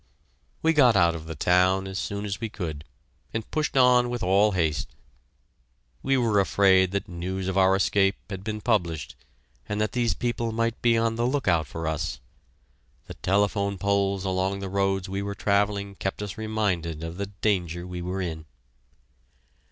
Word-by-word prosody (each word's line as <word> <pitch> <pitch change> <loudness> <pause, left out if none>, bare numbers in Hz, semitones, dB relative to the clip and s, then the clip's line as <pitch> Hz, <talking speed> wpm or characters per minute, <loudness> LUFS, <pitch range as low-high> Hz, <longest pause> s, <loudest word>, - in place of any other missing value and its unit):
We 160 0 +4
got 130 -7 +5
out 85 -3 +4
of 80 -1 -8
the 80 - -5
town 90 +4 +3
as 95 0 -4
soon 100 0 -3
as 100 +2 -4
we 115 - -2
could, 80 -8 -6 0.5
and 110 -1 -4
pushed 155 -3 -1
on 125 -1 +5
with 120 -3 -3
all 100 +3 +3
haste; 80 -6 -1 1.1
we 135 0 +2
were 115 -5 +2
afraid 95 -1 +4
that 100 +1 -3
news 90 +2 -4
of 95 - -2
our 95 0 +4
escape 95 0 +2
had 95 -2 -7
been 105 0 -4
published, 85 - -1 0.5
and 105 - -2
that 110 0 0
these 120 -2 0
people 120 -1 -2
might 115 +1 -1
be 115 -1 +4
on 115 0 0
the 120 +1 +1
lookout 100 - +1
for 80 0 -6
us. 80 -4 -2 0.9
The - - -8
telephone 100 +1 0
poles 100 0 0
along 95 +1 0
the 100 -1 -5
roads 95 0 0
we 95 +1 -3
were 100 0 -4
travelling 100 0 0
kept 95 +1 -4
us 100 -2 -6
reminded 100 -8 -2
of 80 +1 -6
the 100 0 -3
danger 90 -4 -1
we 90 -1 -6
were 90 +2 -3
in. 80 -3 -5
100 Hz, 175 wpm, -26 LUFS, 90-110 Hz, 1.1 s, got